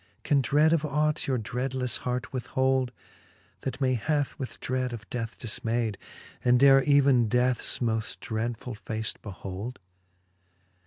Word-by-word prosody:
Can 140 -2 +3
dread 150 +6 +4
of 160 -2 +2
ought 150 +1 0
your 130 -2 +1
dreadlefTe 125 +3 -2
hart 125 +4 -3
withhold, 130 0 +1 0.7
That 135 - -4
many 130 -2 +2
hath 145 +4 0
with 130 - -6
dread 130 -1 -1
of 110 -2 -8
death 115 -3 -4
diiinayd, 115 -2 -1 0.5
And 125 0 +5
dare 135 0 +7
even 135 -3 +4
deathes 125 +1 +1
moft 110 -3 -1
dreadfull 115 +1 -3
face 110 0 -3
behold 100 +4 -6
125 Hz, 135 wpm, -28 LUFS, 115-135 Hz, 0.7 s, dare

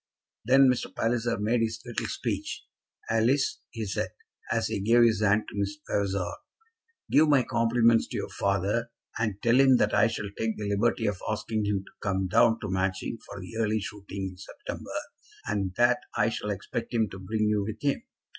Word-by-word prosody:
Then 135 +3 +6
Mr. 125 -1 +1
Palliser 115 0 0
made 110 +3 +1
his 115 0 -1
little 120 -2 -3
speech. - - -3 0.4
"Alice," 115 +5 +2
he 115 -2 -5
said, 100 - -2 0.4
as 115 0 +1
he 110 -2 -2
gave 115 +4 +5
his 110 -3 +3
hand 105 +1 +3
to - - -9
Miss 100 0 -2
Vavasor, 95 -3 -1 0.7
"give 155 +1 +5
my 140 -3 +5
compliments 115 0 +3
to - - -5
your - - -3
father, 100 +4 0 0.3
and 105 -3 -1
tell 120 +2 +4
him 135 -2 +6
that 105 - +2
I 105 - +5
shall 105 -3 -4
take 110 0 -2
the 105 -1 -3
liberty 110 +3 +1
of 105 -3 -1
asking 110 0 -1
him 100 -2 0
to - - -16
come 95 -2 0
down 115 +3 +4
to - - -3
Matching 95 +4 -1
for - - -8
the 95 +5 -9
early 110 -1 +1
shooting 100 -1 -5
in 90 - -15
September, - - -8 0.6
and 100 -3 -2
that 120 0 +4 0.2
I - - +3
shall 105 - -4
expect 115 +4 -4
him 110 -2 +3
to 95 - -8
bring 110 +3 -1
you 105 -1 +2
with 110 +2 -5
him. 140 -1 +1
110 Hz, 190 wpm, -28 LUFS, 100-115 Hz, 0.7 s, Then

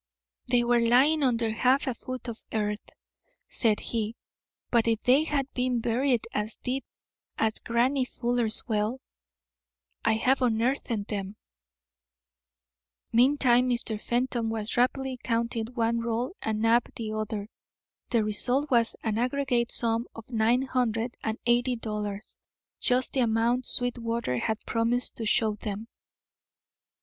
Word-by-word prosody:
"They 245 -1 +3
were 240 0 +3
lying 260 +7 +4
under 235 -4 +1
half 255 +6 +2
a 260 - -1
foot 255 +2 -7
of 235 -1 -7
earth," 210 -1 -2 0.6
said 220 -3 +2
he, 225 -1 -2 0.6
"but 235 -2 +3
if 225 -1 +1
they 270 +5 +4
had 285 -3 0
been 250 -1 0
buried 240 +1 +1
as 210 +1 -1
deep 260 +1 -3 0.5
as 220 -1 +2
Grannie 255 +3 +1
Fuller's 240 -3 -1
well, 215 +3 -1 1.0
I'd 225 0 +2
have 265 +1 +3
unearthed 245 +3 +1 0.2
them." 200 -1 -4 1.8
Meantime 250 0 +4
Mr. 235 -3 -1
Fenton 240 -1 -1
was 220 -1 -2
rapidly 255 +1 0
counting 230 -1 -1
one 235 -1 0
roll 235 +5 -2
and 220 0 -2
Knapp 230 +2 +3
the 220 -2 -4
other. 215 -1 -3 0.6
The 230 -3 +2
result 250 +7 +1
was 235 -2 +3
an 220 -1 -1
aggregate 250 -1 0
sum 230 0 0
of 225 - -10
nine 235 +3 +2
hundred 240 -2 -1
and 220 0 -2
eighty 245 +1 +3
dollars, 210 -2 -5 0.4
just 250 +1 +2
the 270 - 0
amount 235 +1 +1
Sweetwater 235 - -1
had 220 - -2
promised 235 +2 +1
to 225 - -3
show 215 0 +3
them. 210 +1 -5
235 Hz, 135 wpm, -27 LUFS, 220-250 Hz, 1.8 s, lying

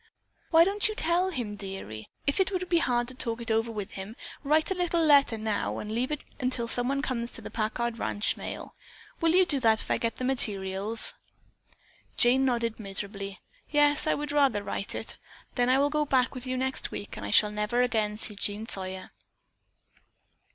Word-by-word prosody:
"Why 330 0 +7
don't 400 +3 +1
you 430 - -4
tell 350 +2 +2
him, 240 - -3
dearie? 195 - -7 0.2
If 280 - +1
it 385 0 +2
would 365 -1 -2
be 340 -1 +3
hard 240 -6 +1
to - - -8
talk 230 -2 -2
it 230 -1 -3
over 225 +1 +1
with 210 -1 -5
him, 195 +3 -7 0.3
write 310 +5 +2
a - - +4
little 355 -2 0
letter 280 -6 +5
now 215 -1 -2
and 210 - -5
leave 240 +3 -1
it 300 - -3 0.2
until 250 -2 0
someone 260 +4 +2
comes 240 -4 -2
for - - -8
the - - -8
Packard 235 +1 -2
ranch 205 0 -1
mail. - - -7 0.5
Will 330 0 +3
you 370 0 +6
do 290 -6 +2
that 225 -3 +3
if - - -5
I - - +2
get 230 -1 -1
the - - -5
materials?" 210 -4 +1 1.0
Jane 255 +2 +5
nodded 235 -3 0
miserably. 200 -1 -1 0.3
"Yes, 295 0 +3
I - - +3
would 295 0 -4
rather 275 -8 +3
write 200 - -3
it. - - -5 0.3
Then 245 -1 +1
I 260 - +5
will 285 +1 +2
go 300 0 +1
back 260 -3 +2
with 255 -1 -7
you 255 0 -1
next 265 +1 -1
week 205 - -6
and - - -7
I - - -4
shall 210 -1 +4
never 210 +4 +1
again 215 -4 0
see 215 - -1
Jean 205 +2 -3
Sawyer." 190 -3 -4
240 Hz, 200 wpm, -28 LUFS, 210-285 Hz, 1.0 s, Why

